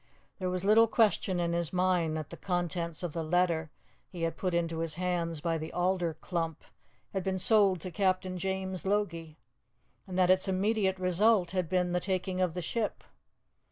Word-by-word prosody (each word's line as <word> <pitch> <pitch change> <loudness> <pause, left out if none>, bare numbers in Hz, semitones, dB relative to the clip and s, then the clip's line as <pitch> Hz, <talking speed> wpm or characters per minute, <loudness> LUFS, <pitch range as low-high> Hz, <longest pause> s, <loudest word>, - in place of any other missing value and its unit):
There 185 -1 -1
was 180 +1 -3
little 220 +2 +6
question 210 -5 +2
in 170 -1 0
his 170 -2 -1
mind 180 -3 +1
that 155 -1 -6
the - - -6
contents 175 -2 -2
of 170 -4 -3
the 165 - -2
letter 165 -1 +1 0.4
he 175 -3 -6
had 165 - -1
put 185 -2 -2
into 165 -1 -1
his 165 -2 -2
hands 170 -3 -2
by 165 0 -1
the 160 +1 -6
alder 180 -2 0
clump 165 -3 -3 0.5
had 190 -2 -1
been 190 0 -1
sold 195 -2 +4
to 185 - -6
Captain 185 -1 0
James 190 0 -3
Logie, 170 -6 -2 0.7
and 185 -1 -5
that 185 -1 +5
its 185 +1 +3
immediate 190 0 +1
result 185 +1 +2
had 185 -4 -1
been 180 -1 +1
the 180 - +1
taking 185 0 -2
of 180 -2 0
the 180 - -3
ship. 220 +6 -2
180 Hz, 185 wpm, -30 LUFS, 170-190 Hz, 0.7 s, little